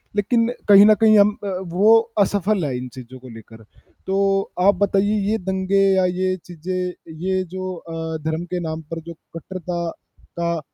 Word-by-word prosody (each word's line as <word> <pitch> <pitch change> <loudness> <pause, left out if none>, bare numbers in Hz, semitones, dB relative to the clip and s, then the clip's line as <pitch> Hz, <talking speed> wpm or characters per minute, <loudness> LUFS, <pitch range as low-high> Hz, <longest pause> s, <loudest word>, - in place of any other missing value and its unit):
लेकिन 230 +3 +1 0.2
कहीं 200 0 +9
न 215 - +7
कहीं 215 -1 +6
हम 205 +1 +4
अ, 205 - -4 0.2
वो 205 +6 +4 0.2
असफल 200 -2 +1
है 130 - -2
इन 125 0 -6
चीज़ 130 0 -11
को 130 0 -12
लेकर। 115 0 -13 0.4
तो 195 +1 +1 0.5
आप 200 - +5
बताइए 205 +2 +1
ये 220 - +1
दंगे 190 +1 +1
या 185 -1 +3
ये 185 +1 0
चीज़ें, 180 +1 -4 0.2
ये 185 +3 -1
जो 185 0 -4
अ, 165 -1 -6
धर्म 160 +2 -2
के 180 - 0
नाम 160 0 -5
पर 165 - -4
जो - - -6 0.2
कट्टरता 175 0 -5 0.5
का 170 -1 -1
185 Hz, 175 wpm, -21 LUFS, 165-200 Hz, 0.5 s, कहीं